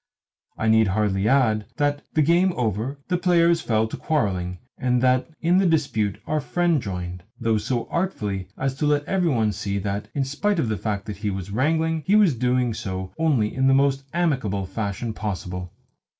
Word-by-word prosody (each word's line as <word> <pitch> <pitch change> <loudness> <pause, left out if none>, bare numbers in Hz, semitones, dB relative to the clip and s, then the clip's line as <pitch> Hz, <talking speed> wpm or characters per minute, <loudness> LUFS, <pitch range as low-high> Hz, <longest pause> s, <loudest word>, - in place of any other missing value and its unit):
I 110 - -1
need 110 -1 +5
hardly 100 0 +1
add 110 -5 +2
that, 145 0 +1
the 155 - +4
game 175 +4 +3
over, 120 - -2
the 180 -1 0
players 170 -2 +3
fell 110 -3 +1
to - - -6
quarrelling, 95 - -1 0.2
and 125 -1 +1
that 130 +3 +2
in 175 +3 +3
the 195 - +3
dispute 125 - 0
our 155 -1 0
friend 170 0 +1
joined, 90 -3 -5 0.2
though 115 -2 +1
so 120 +2 -2
artfully 105 - -2
as 135 0 -1
to 150 - 0
let 145 0 +2
every 180 -2 +1
one 110 -6 +2
see 100 0 -3
that, 100 +1 -3
in 140 - +1
spite 200 +9 0
of 125 -9 0
the 110 - -1
fact 100 +1 -3
that 105 -2 -6
he 105 +1 -2
was 95 0 -5
wrangling, 160 +7 +1
he 200 - +4
was 205 -8 +5
doing 125 0 +1
so 95 -3 -5
only 135 -10 +2
in 130 +1 +2
the 135 - +5
most 135 0 +2
amicable 130 - 0
fashion 105 +3 -3
possible. 90 -4 -5
120 Hz, 190 wpm, -24 LUFS, 105-155 Hz, 0.2 s, need